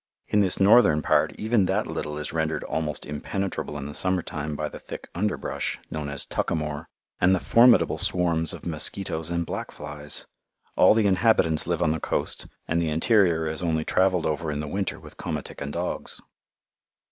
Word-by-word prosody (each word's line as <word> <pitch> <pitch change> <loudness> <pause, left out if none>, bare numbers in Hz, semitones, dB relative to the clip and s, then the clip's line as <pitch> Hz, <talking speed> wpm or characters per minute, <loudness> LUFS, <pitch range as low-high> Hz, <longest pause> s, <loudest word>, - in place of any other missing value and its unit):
In 105 - +3
this 95 -3 +3
northern 95 -7 +5
part - - +3
even 110 -2 +2
that - - 0
little 75 0 -4
is 75 - -4
rendered 80 -1 -1
almost 75 -3 -2
impenetrable 75 +1 -4
in 70 - -6
the 75 - -6
summer 95 +2 +1
time 75 0 -4
by 75 +1 -2
the - - -9
thick - - -9
under 105 +4 -1
brush, - - -3
known 75 -2 -4
as 70 -1 -1
"tuckamore," 75 -1 -2 0.3
and 95 +1 +4
the - - -1
formidable 115 -10 +5
swarms 85 -4 +1
of - - -9
mosquitoes 80 0 0
and 85 0 -1
black - - -5
flies. 75 0 -3 0.5
All - - +6
the 110 -2 +3
inhabitants 95 -5 +3
live - - 0
on 75 - +2
the 80 - -1
coast, - - -1 0.2
and 85 +1 +1
the 80 - 0
interior 85 -1 +2
is 80 0 -3
only 80 -2 0
travelled 95 -2 +2
over 80 +1 -1
in 75 -1 -3
the 75 - -4
winter 95 +4 -3
with - - -13
komatik - - -5
and 70 0 -4
dogs. 85 +3 -4
80 Hz, 185 wpm, -25 LUFS, 75-95 Hz, 0.5 s, All